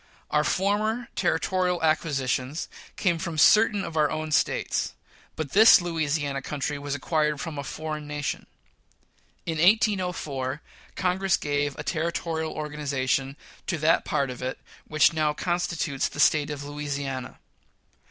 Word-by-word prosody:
Our 150 Hz, 0 st, +3 dB
former 215 Hz, +7 st, 0 dB
territorial 180 Hz, 0 st, 0 dB
acquisitions 145 Hz, -3 st, 0 dB, 0.3 s
came 175 Hz, -4 st, +1 dB
from 170 Hz, -2 st, -4 dB
certain 210 Hz, +5 st, +5 dB
of 165 Hz, -, -7 dB
our 150 Hz, -2 st, +3 dB
own 155 Hz, 0 st, -3 dB
States; -, -, 0 dB, 0.4 s
but 155 Hz, -4 st, -4 dB
this 220 Hz, +3 st, +8 dB
Louisiana 155 Hz, -5 st, -1 dB
country 145 Hz, +1 st, -3 dB
was 145 Hz, 0 st, -3 dB
acquired 150 Hz, +1 st, 0 dB
from 155 Hz, -2 st, -5 dB
a -, -, -3 dB
foreign 155 Hz, +1 st, -5 dB
nation. 150 Hz, -1 st, -4 dB, 1.0 s
In 160 Hz, -2 st, -2 dB
1804, 175 Hz, -, +1 dB, 0.3 s
Congress 185 Hz, 0 st, +1 dB
gave 145 Hz, -1 st, -1 dB
a -, -, -5 dB
territorial 160 Hz, -1 st, -2 dB
organization 140 Hz, -2 st, -2 dB, 0.3 s
to 170 Hz, -, -1 dB
that 160 Hz, +2 st, +3 dB
part 140 Hz, -4 st, -1 dB
of 125 Hz, -, -9 dB
it 130 Hz, +1 st, -3 dB, 0.3 s
which 155 Hz, +1 st, +4 dB
now 155 Hz, -2 st, +1 dB
constitutes 170 Hz, -5 st, -1 dB
the -, -, -10 dB
State 150 Hz, 0 st, +4 dB
of 145 Hz, -1 st, -5 dB
Lousiana. 145 Hz, -2 st, -4 dB
155 Hz, 135 wpm, -26 LUFS, 145-170 Hz, 1.0 s, this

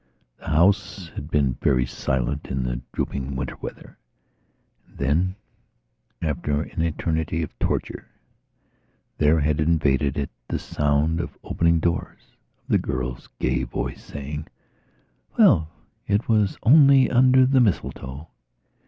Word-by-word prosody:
The -, -, -12 dB
house 90 Hz, +2 st, +2 dB
had 75 Hz, -, -7 dB
been 70 Hz, -5 st, +1 dB
very 65 Hz, -2 st, +2 dB
silent 65 Hz, +2 st, -2 dB
in 65 Hz, -1 st, -2 dB
the -, -, -3 dB
drooping 70 Hz, 0 st, -3 dB
winter 65 Hz, -, -4 dB
weather. -, -, -9 dB, 0.9 s
And -, -, -21 dB
then, 80 Hz, +7 st, +1 dB, 0.9 s
after 75 Hz, -2 st, -1 dB
an 80 Hz, -, -5 dB
eternity 80 Hz, 0 st, -1 dB
of 75 Hz, -, -6 dB
torture, -, -, -2 dB, 1.1 s
there 75 Hz, +2 st, +4 dB
had 75 Hz, +1 st, +1 dB
invaded 75 Hz, -3 st, +1 dB
it 70 Hz, -1 st, -2 dB, 0.2 s
the -, -, -2 dB
sound 75 Hz, +3 st, 0 dB
of 85 Hz, -, -5 dB
opening 85 Hz, 0 st, +2 dB
doors, 85 Hz, +1 st, -3 dB, 0.3 s
of -, -, -39 dB
the -, -, +4 dB
girl's 65 Hz, -1 st, -4 dB
gay -, -, 0 dB
voice -, -, -4 dB
saying: 75 Hz, +2 st, -6 dB, 0.9 s
"Well, 80 Hz, -1 st, +5 dB, 0.4 s
it 105 Hz, +2 st, +1 dB
was 105 Hz, -4 st, +2 dB
only 135 Hz, 0 st, +7 dB
under 130 Hz, +1 st, +5 dB
the 130 Hz, 0 st, +3 dB
mistletoe."... 75 Hz, -, -2 dB
75 Hz, 125 wpm, -24 LUFS, 70-85 Hz, 1.1 s, only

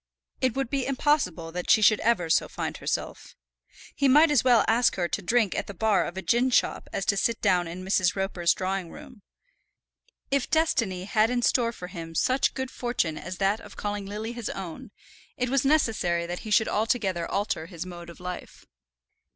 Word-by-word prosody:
It 255 Hz, -3 st, +1 dB
would 270 Hz, -3 st, -2 dB
be 275 Hz, -3 st, -1 dB
impossible 255 Hz, -, 0 dB
that 180 Hz, +1 st, -5 dB
she 215 Hz, -, +5 dB
should 215 Hz, 0 st, +5 dB
ever 220 Hz, -7 st, +1 dB
so 160 Hz, -, +2 dB
find -, -, -4 dB
herself. -, -, -4 dB, 0.6 s
He 280 Hz, -, +1 dB
might 300 Hz, +4 st, +6 dB
as 285 Hz, -6 st, +3 dB
well 245 Hz, -4 st, +5 dB
ask 235 Hz, +2 st, +3 dB
her 175 Hz, -2 st, 0 dB
to -, -, -3 dB
drink 225 Hz, 0 st, +1 dB
at -, -, -3 dB
the 200 Hz, -, -8 dB
bar 210 Hz, +1 st, +2 dB
of 175 Hz, -, -8 dB
a 190 Hz, -, -4 dB
gin 240 Hz, +8 st, +2 dB
shop 250 Hz, -, +1 dB
as 195 Hz, -, -3 dB
to 200 Hz, -, +2 dB
sit 230 Hz, +3 st, 0 dB
down 180 Hz, -2 st, +2 dB
in 180 Hz, +2 st, -7 dB
Mrs. 185 Hz, -2 st, +2 dB
Roper's 190 Hz, -3 st, +1 dB
drawing 190 Hz, -2 st, -3 dB
room. 255 Hz, -, -13 dB, 1.1 s
If 275 Hz, -1 st, 0 dB
destiny 230 Hz, -, +1 dB
had 215 Hz, +2 st, +2 dB
in 245 Hz, -1 st, -1 dB
store 235 Hz, -2 st, +2 dB
for 180 Hz, -, -9 dB
him 165 Hz, -3 st, -8 dB
such 260 Hz, +9 st, +1 dB
good 260 Hz, -1 st, -4 dB
fortune 240 Hz, -10 st, -2 dB
as 185 Hz, 0 st, -7 dB
that 200 Hz, +3 st, +1 dB
of -, -, -13 dB
calling 205 Hz, -1 st, -4 dB
Lily 215 Hz, +3 st, -5 dB
his 235 Hz, -3 st, -5 dB
own, 180 Hz, -4 st, -7 dB, 0.5 s
it 250 Hz, -1 st, -1 dB
was 275 Hz, -2 st, +2 dB
necessary 225 Hz, -, +1 dB
that 175 Hz, +1 st, -5 dB
he 220 Hz, -, -8 dB
should 220 Hz, +1 st, +3 dB
altogether 205 Hz, -6 st, 0 dB
alter 200 Hz, -5 st, -2 dB
his 170 Hz, -1 st, -7 dB
mode 175 Hz, -1 st, -9 dB
of 170 Hz, -, -12 dB
life. 180 Hz, 0 st, -8 dB
205 Hz, 200 wpm, -26 LUFS, 180-245 Hz, 1.1 s, might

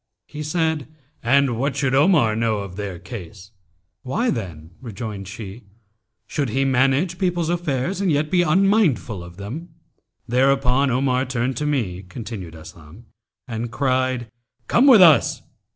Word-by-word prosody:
He 150 Hz, -, -8 dB
said, 160 Hz, -1 st, -1 dB, 0.3 s
'And 125 Hz, -1 st, +2 dB
what 140 Hz, +2 st, -1 dB
should 135 Hz, -2 st, 0 dB
Omar 140 Hz, -, +4 dB
know 110 Hz, -1 st, 0 dB
of 100 Hz, -3 st, -6 dB
their 100 Hz, -3 st, -5 dB
case?' 95 Hz, +1 st, -10 dB, 0.5 s
'Why 225 Hz, -, -1 dB
then,' 85 Hz, -7 st, -6 dB
rejoined 105 Hz, -4 st, -6 dB
she, 105 Hz, +2 st, -9 dB, 0.6 s
'should 145 Hz, -5 st, -2 dB
he 135 Hz, +5 st, 0 dB
manage 135 Hz, +7 st, +1 dB
people's 175 Hz, -3 st, 0 dB
affairs 175 Hz, +1 st, -2 dB
and 190 Hz, -4 st, +1 dB
yet 150 Hz, +1 st, 0 dB
be 180 Hz, -, +4 dB
unmindful 175 Hz, -, +2 dB
of 85 Hz, +1 st, -12 dB
them?' 130 Hz, -, -7 dB, 0.6 s
Thereupon 135 Hz, +2 st, +2 dB
Omar 130 Hz, +1 st, +1 dB
turned 125 Hz, 0 st, -2 dB
to 150 Hz, -, -1 dB
me 110 Hz, -11 st, -1 dB
(continned 95 Hz, -3 st, -8 dB
Aslam) 80 Hz, +5 st, -13 dB, 0.4 s
and 115 Hz, 0 st, -4 dB
cried, 130 Hz, 0 st, -1 dB, 0.4 s
'Come 270 Hz, -, +4 dB
with 230 Hz, -8 st, +9 dB
us!' 160 Hz, -4 st, +4 dB
130 Hz, 140 wpm, -22 LUFS, 105-150 Hz, 0.6 s, with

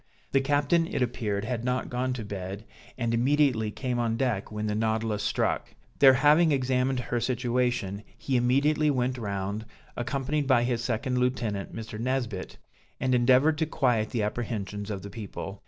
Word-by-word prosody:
The 135 Hz, -, +3 dB
captain 145 Hz, +4 st, +2 dB
it 130 Hz, -, 0 dB
appeared 105 Hz, -4 st, -2 dB
had 120 Hz, -1 st, -3 dB
not 125 Hz, +1 st, -1 dB
gone 125 Hz, +1 st, -1 dB
to 115 Hz, -4 st, -5 dB
bed, 100 Hz, +1 st, -6 dB, 0.3 s
and 115 Hz, -2 st, -1 dB
immediately 125 Hz, -2 st, +2 dB
came 125 Hz, +2 st, -3 dB
on 115 Hz, -1 st, 0 dB
deck 115 Hz, -6 st, -1 dB
when 105 Hz, 0 st, -3 dB
the 105 Hz, -, -1 dB
Nautilus 110 Hz, -1 st, 0 dB
struck; -, -, -1 dB, 0.2 s
there 135 Hz, -2 st, +8 dB
having 150 Hz, +5 st, +5 dB
examined 130 Hz, -1 st, +1 dB
her 120 Hz, 0 st, -2 dB
situation, 120 Hz, -4 st, -1 dB, 0.2 s
he 135 Hz, -, -2 dB
immediately 140 Hz, +5 st, +3 dB
went 130 Hz, -2 st, 0 dB
round, 100 Hz, 0 st, -3 dB, 0.3 s
accompanied 140 Hz, +4 st, -1 dB
by 125 Hz, -3 st, +4 dB
his 120 Hz, -1 st, -1 dB
second 125 Hz, +2 st, -1 dB
lieutenant, 120 Hz, -6 st, -1 dB
Mr. 110 Hz, -1 st, -6 dB
Nesbit, 120 Hz, -6 st, -2 dB, 0.4 s
and 130 Hz, -1 st, +1 dB
endeavored 130 Hz, +5 st, +4 dB
to 160 Hz, -, +1 dB
quiet 120 Hz, -7 st, +1 dB
the 115 Hz, -3 st, -1 dB
apprehensions 105 Hz, -2 st, -3 dB
of 100 Hz, -2 st, -4 dB
the 100 Hz, -, -8 dB
people. 100 Hz, -2 st, -7 dB
120 Hz, 165 wpm, -27 LUFS, 110-130 Hz, 0.4 s, there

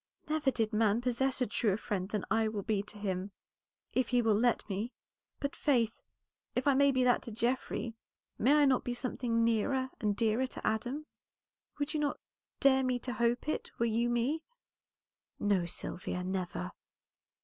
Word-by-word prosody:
"Never 305 Hz, -2 st, +2 dB
did 225 Hz, -4 st, 0 dB
man 215 Hz, 0 st, +3 dB
possess 255 Hz, +2 st, 0 dB
a -, -, +4 dB
truer 205 Hz, -2 st, +1 dB
friend 195 Hz, -4 st, -3 dB
than 210 Hz, -2 st, -2 dB
I 225 Hz, 0 st, +3 dB
will 210 Hz, -2 st, -3 dB
be 210 Hz, -2 st, +1 dB
to 205 Hz, +1 st, -11 dB
him 190 Hz, -1 st, -2 dB, 0.6 s
if 255 Hz, -2 st, +2 dB
he 245 Hz, -, +2 dB
will 225 Hz, -1 st, +4 dB
let 235 Hz, +2 st, +2 dB
me. 210 Hz, +4 st, -3 dB, 0.5 s
But, 280 Hz, -, -2 dB
Faith, 235 Hz, -6 st, +1 dB, 0.5 s
if 250 Hz, -, 0 dB
I 285 Hz, -, +5 dB
may 280 Hz, +1 st, +5 dB
be 255 Hz, -1 st, +2 dB
that 245 Hz, -1 st, +4 dB
to 235 Hz, -, -8 dB
Geoffrey, 235 Hz, +1 st, -1 dB, 0.5 s
may 270 Hz, +6 st, +5 dB
I 295 Hz, -1 st, +6 dB
not 265 Hz, -2 st, +3 dB
be 245 Hz, -, -2 dB
something 245 Hz, -2 st, 0 dB
nearer 260 Hz, +4 st, +1 dB
and 210 Hz, -3 st, +1 dB
dearer 230 Hz, +4 st, +2 dB
to -, -, -8 dB
Adam? 245 Hz, +8 st, -1 dB, 0.7 s
Would 290 Hz, +1 st, -2 dB
not 295 Hz, -2 st, 0 dB
you -, -, -61 dB
dare 265 Hz, -1 st, +5 dB, 0.2 s
to 250 Hz, -, -3 dB
hope 235 Hz, +4 st, +1 dB
it, 310 Hz, -, -2 dB
were 235 Hz, -, +2 dB
you 235 Hz, +1 st, +1 dB
me?" 245 Hz, +7 st, +1 dB, 1.0 s
"No, 195 Hz, -4 st, +2 dB
Sylvia, 180 Hz, +1 st, -4 dB
never." 180 Hz, -, -3 dB
235 Hz, 170 wpm, -32 LUFS, 210-260 Hz, 1.0 s, I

